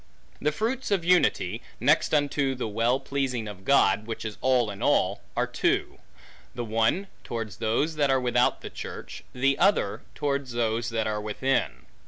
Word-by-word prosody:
The 150 Hz, -, +2 dB
fruits 235 Hz, -, -2 dB
of 195 Hz, -5 st, +1 dB
unity 125 Hz, -, +2 dB, 0.2 s
(next 150 Hz, +6 st, +3 dB
unto 145 Hz, -2 st, +1 dB
the 125 Hz, -, -3 dB
well 115 Hz, +5 st, +1 dB
pleasing 135 Hz, -4 st, -2 dB
of 100 Hz, -2 st, -9 dB
God, 105 Hz, -4 st, +3 dB
which 115 Hz, 0 st, -5 dB
is 110 Hz, -2 st, -6 dB
all 125 Hz, -4 st, +2 dB
in 100 Hz, -, -9 dB
all) -, -, +2 dB, 0.2 s
are -, -, +2 dB
two: -, -, -1 dB, 0.6 s
the 120 Hz, -1 st, -3 dB
one, 115 Hz, -, +1 dB, 0.2 s
towards 115 Hz, -4 st, -5 dB
those 120 Hz, +8 st, 0 dB
that 145 Hz, -2 st, +2 dB
are 135 Hz, 0 st, +3 dB
without 125 Hz, -1 st, +2 dB
the -, -, -8 dB
church, -, -, -8 dB
the 135 Hz, +2 st, +1 dB
other, 200 Hz, +3 st, +2 dB
towards 140 Hz, -3 st, -2 dB
those 115 Hz, 0 st, 0 dB
that 115 Hz, -1 st, -1 dB
are 105 Hz, -1 st, -1 dB
within. 105 Hz, -, -1 dB
125 Hz, 170 wpm, -27 LUFS, 110-140 Hz, 0.6 s, next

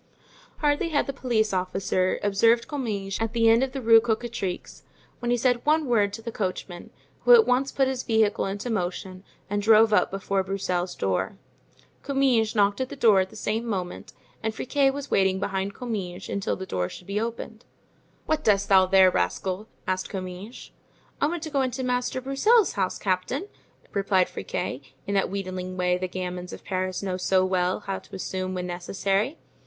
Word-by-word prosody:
Hardly 295 Hz, +3 st, +1 dB
had 290 Hz, -3 st, +1 dB
the 275 Hz, -, -4 dB
police 230 Hz, -6 st, 0 dB
officer 185 Hz, 0 st, 0 dB
observed 225 Hz, +4 st, +3 dB
Comminges 210 Hz, -9 st, -3 dB
at 225 Hz, 0 st, -1 dB
the 230 Hz, -1 st, +3 dB
end 225 Hz, +2 st, +6 dB
of 265 Hz, -1 st, 0 dB
the 265 Hz, -1 st, -5 dB
Rue 225 Hz, 0 st, +7 dB
Cocatrix 225 Hz, -5 st, -3 dB, 0.4 s
when 240 Hz, -, -3 dB
he 245 Hz, -, +3 dB
said 245 Hz, 0 st, +1 dB
one 310 Hz, +1 st, +3 dB
word 215 Hz, -5 st, +2 dB
to 225 Hz, -, -7 dB
the 230 Hz, -, -4 dB
coachman, 185 Hz, -3 st, -4 dB, 0.3 s
who -, -, +7 dB
at 450 Hz, -2 st, +6 dB
once 265 Hz, +2 st, +1 dB
put 270 Hz, -1 st, +2 dB
his 260 Hz, -1 st, -2 dB
vehicle 220 Hz, -5 st, +1 dB
into 205 Hz, +5 st, -4 dB
motion 185 Hz, -1 st, -3 dB, 0.2 s
and 205 Hz, 0 st, -1 dB
drove 220 Hz, +1 st, +5 dB
up -, -, +4 dB
before 195 Hz, 0 st, -1 dB
Broussel's 185 Hz, -2 st, -2 dB
door. 95 Hz, -, -1 dB, 0.6 s
Comminges 260 Hz, -6 st, +2 dB
knocked 205 Hz, +2 st, +2 dB
at 260 Hz, -, -2 dB
the -, -, -7 dB
door 220 Hz, -7 st, +5 dB
at 190 Hz, 0 st, 0 dB
the -, -, -15 dB
same 220 Hz, +2 st, -2 dB
moment, 190 Hz, -6 st, -4 dB, 0.3 s
and 220 Hz, -1 st, -2 dB
Friquet 275 Hz, +3 st, +2 dB
was 280 Hz, 0 st, -7 dB
waiting 190 Hz, -1 st, +3 dB
behind 195 Hz, 0 st, -2 dB
Comminges 200 Hz, -8 st, -5 dB
until 200 Hz, -, -1 dB
the 190 Hz, -, -6 dB
door 90 Hz, -, -2 dB
should 180 Hz, -, -11 dB
be 200 Hz, +3 st, -2 dB
opened. 230 Hz, 0 st, -5 dB, 0.6 s
"What 310 Hz, -1 st, 0 dB
dost 200 Hz, -2 st, +2 dB
thou 190 Hz, -1 st, +6 dB
there, 190 Hz, -1 st, +6 dB
rascal?" 185 Hz, -, -1 dB, 0.2 s
asked 185 Hz, 0 st, -2 dB
Comminges. 185 Hz, +4 st, -7 dB, 0.5 s
"I 290 Hz, -, +4 dB
want 335 Hz, 0 st, -3 dB
to 315 Hz, -, -5 dB
go 280 Hz, -2 st, +1 dB
into 260 Hz, 0 st, -2 dB
Master 250 Hz, 0 st, -1 dB
Broussel's 370 Hz, -, +3 dB
house, 190 Hz, -3 st, -1 dB
captain," 200 Hz, -, -2 dB, 0.4 s
replied 195 Hz, -2 st, +2 dB
Friquet, 140 Hz, -6 st, -4 dB, 0.2 s
in 200 Hz, -, -3 dB
that 195 Hz, -1 st, +2 dB
wheedling 185 Hz, -1 st, -4 dB
way 180 Hz, 0 st, +2 dB
the 185 Hz, -, -2 dB
"gamins" 180 Hz, 0 st, -5 dB
of -, -, -9 dB
Paris 185 Hz, 0 st, -2 dB
know 185 Hz, -2 st, -2 dB
so 185 Hz, 0 st, +2 dB
well 185 Hz, +1 st, 0 dB
how 195 Hz, -2 st, -4 dB
to -, -, -12 dB
assume 185 Hz, 0 st, -3 dB
when 180 Hz, 0 st, -3 dB
necessary. 195 Hz, -, -1 dB
200 Hz, 185 wpm, -26 LUFS, 185-245 Hz, 0.6 s, Rue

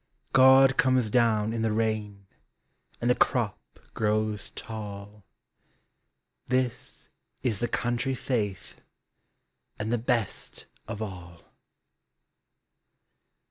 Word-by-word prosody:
God 135 Hz, 0 st, +7 dB
comes 130 Hz, -4 st, +3 dB
down 110 Hz, -2 st, +2 dB
in 115 Hz, -, -2 dB
the 110 Hz, -1 st, +1 dB
rain, 105 Hz, -3 st, -2 dB, 0.7 s
And 120 Hz, -, -1 dB
the 125 Hz, -, +5 dB
crop 120 Hz, -5 st, +1 dB, 0.3 s
grows 110 Hz, -1 st, 0 dB
tall 105 Hz, -2 st, -8 dB, 0.6 s
— -, -, -48 dB, 0.5 s
This 130 Hz, -1 st, -2 dB, 0.3 s
is 115 Hz, -6 st, 0 dB
the 120 Hz, -, 0 dB
country 120 Hz, +3 st, -1 dB
faith, 105 Hz, -7 st, -3 dB, 1.0 s
And 110 Hz, +2 st, -2 dB
the 120 Hz, -, +1 dB
best 115 Hz, -3 st, -2 dB, 0.2 s
of 105 Hz, -, -4 dB
all 90 Hz, -4 st, -9 dB
110 Hz, 100 wpm, -27 LUFS, 105-125 Hz, 1.0 s, God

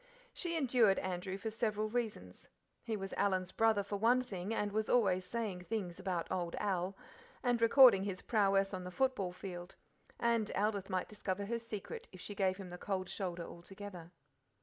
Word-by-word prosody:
She 335 Hz, -2 st, -1 dB
endured 245 Hz, -8 st, +4 dB
Andrew 185 Hz, 0 st, -3 dB
for 220 Hz, +2 st, -4 dB
several 215 Hz, -1 st, 0 dB
reasons. 215 Hz, -, -4 dB, 0.3 s
He 225 Hz, -2 st, -2 dB
was 195 Hz, -1 st, -5 dB
Alan's 190 Hz, -2 st, +1 dB
brother 220 Hz, -2 st, +3 dB
for 200 Hz, +1 st, -3 dB
one 240 Hz, +5 st, +4 dB
thing, 195 Hz, -4 st, -5 dB
and 210 Hz, -2 st, 0 dB
was 215 Hz, +1 st, -1 dB
always 190 Hz, -6 st, +3 dB
saying 195 Hz, -3 st, -3 dB
things 190 Hz, -5 st, -3 dB
about 185 Hz, -3 st, -1 dB
"old 175 Hz, -2 st, -1 dB
Al," 195 Hz, -1 st, -1 dB, 0.5 s
and 245 Hz, -2 st, +2 dB
recording 230 Hz, -4 st, +8 dB
his 195 Hz, -2 st, -4 dB
prowess 195 Hz, -3 st, +3 dB
on 185 Hz, -1 st, -3 dB
the 180 Hz, -, -5 dB
football 205 Hz, -3 st, 0 dB
field; 180 Hz, -1 st, -7 dB, 0.4 s
and 230 Hz, -2 st, +2 dB
Aldith 200 Hz, -1 st, 0 dB
might 185 Hz, -1 st, -1 dB
discover 200 Hz, -1 st, -3 dB
her 235 Hz, +3 st, -2 dB
secret 225 Hz, -3 st, -6 dB
if 185 Hz, -, -12 dB
she 205 Hz, -, -6 dB
gave 190 Hz, -2 st, +1 dB
him 190 Hz, -3 st, -8 dB
the 180 Hz, -, -7 dB
cold 185 Hz, -2 st, -2 dB
shoulder 180 Hz, -3 st, -3 dB
altogether. 175 Hz, 0 st, -9 dB
200 Hz, 175 wpm, -35 LUFS, 185-225 Hz, 0.5 s, recording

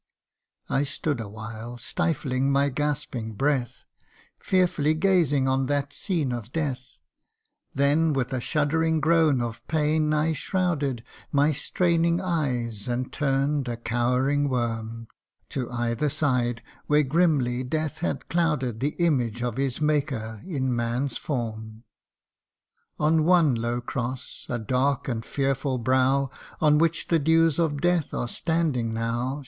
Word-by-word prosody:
I 135 Hz, -, +1 dB
stood 145 Hz, -1 st, -2 dB
awhile, 110 Hz, +2 st, -7 dB
stifling 135 Hz, -2 st, -1 dB
my 140 Hz, +1 st, +3 dB
gasping 135 Hz, -5 st, -2 dB
breath, 130 Hz, 0 st, -1 dB, 0.6 s
Fearfully 175 Hz, -5 st, +2 dB
gazing 160 Hz, -6 st, +2 dB
on 130 Hz, 0 st, +1 dB
that 140 Hz, 0 st, -1 dB
scene 165 Hz, -10 st, -1 dB
of 120 Hz, -1 st, -6 dB
death: 135 Hz, -4 st, -3 dB, 0.8 s
Then 145 Hz, +4 st, +3 dB
with 130 Hz, -3 st, -1 dB
a 130 Hz, -, -1 dB
shuddering 160 Hz, +3 st, +1 dB
groan 155 Hz, -4 st, +3 dB
of 115 Hz, -1 st, -5 dB
pain 155 Hz, 0 st, +1 dB
I 155 Hz, +1 st, +2 dB
shrouded 150 Hz, -, -1 dB, 0.3 s
My 145 Hz, +2 st, +3 dB
straining 170 Hz, +2 st, +1 dB
eyes, 125 Hz, -, -2 dB
and 125 Hz, +1 st, -2 dB
turn'd, 140 Hz, -1 st, 0 dB
a 120 Hz, -1 st, -3 dB
cowering 125 Hz, +5 st, +1 dB
worm, 115 Hz, -2 st, -3 dB, 0.4 s
To 125 Hz, -3 st, -3 dB
either 120 Hz, +3 st, -1 dB
side 125 Hz, -5 st, 0 dB, 0.2 s
where 150 Hz, 0 st, +4 dB
grimly 140 Hz, -5 st, +2 dB
death 155 Hz, +4 st, -2 dB
had 175 Hz, -, -3 dB
clouded 150 Hz, -9 st, 0 dB
The 145 Hz, +4 st, -1 dB
image 125 Hz, -9 st, +1 dB
of 120 Hz, -1 st, -2 dB
his 135 Hz, -2 st, -1 dB
maker 135 Hz, -8 st, -1 dB
in 130 Hz, -8 st, -1 dB
man's 120 Hz, +3 st, -1 dB
form. 110 Hz, -4 st, -4 dB, 1.1 s
On 155 Hz, +1 st, +3 dB
one 170 Hz, -4 st, +5 dB
low 120 Hz, +1 st, -1 dB
cross 125 Hz, +2 st, -5 dB
a 120 Hz, -, -1 dB
dark 130 Hz, +5 st, 0 dB
and 115 Hz, -3 st, -2 dB
fearful 135 Hz, 0 st, -1 dB
brow, 130 Hz, +2 st, +2 dB, 0.3 s
On 150 Hz, -1 st, +4 dB
which 165 Hz, 0 st, +1 dB
the 165 Hz, -, +4 dB
dews 160 Hz, +1 st, +3 dB
of 150 Hz, -4 st, +1 dB
death 175 Hz, -4 st, +1 dB
are 120 Hz, -, -1 dB
standing 140 Hz, -7 st, -1 dB
now, -, -, -2 dB
12 -, -, -1 dB
THE 115 Hz, -, 0 dB, 0.2 s
UNDYING 130 Hz, -, -2 dB
ONE. 145 Hz, -, -6 dB
135 Hz, 140 wpm, -26 LUFS, 120-155 Hz, 1.1 s, one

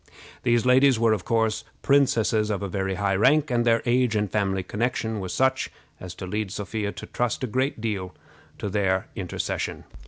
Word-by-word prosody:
These 120 Hz, 0 st, +2 dB
ladies 130 Hz, 0 st, +5 dB
were, 115 Hz, -1 st, +3 dB
of 100 Hz, -5 st, -3 dB
course, 115 Hz, -2 st, +1 dB, 0.2 s
princesses 115 Hz, -6 st, +3 dB
of 105 Hz, -2 st, -1 dB
very 95 Hz, -1 st, -2 dB
high 100 Hz, -1 st, 0 dB
rank, 145 Hz, +8 st, +3 dB
and 120 Hz, -1 st, +2 dB
their 115 Hz, -1 st, +3 dB
age 120 Hz, -2 st, +2 dB
and 105 Hz, -2 st, 0 dB
family 95 Hz, -3 st, 0 dB
connection 110 Hz, +1 st, -2 dB
were 95 Hz, -2 st, -5 dB
such 130 Hz, +8 st, +1 dB, 0.3 s
as 90 Hz, -1 st, -8 dB
to 95 Hz, -, -6 dB
lead 105 Hz, +2 st, -2 dB
Sophia 105 Hz, +1 st, -3 dB
to -, -, -8 dB
trust 120 Hz, 0 st, -2 dB
a -, -, +2 dB
great 130 Hz, +2 st, -1 dB
deal 100 Hz, -5 st, -3 dB, 0.4 s
to -, -, -4 dB
their 95 Hz, -2 st, +1 dB
intercession. 90 Hz, -3 st, -3 dB
110 Hz, 180 wpm, -25 LUFS, 100-120 Hz, 0.4 s, ladies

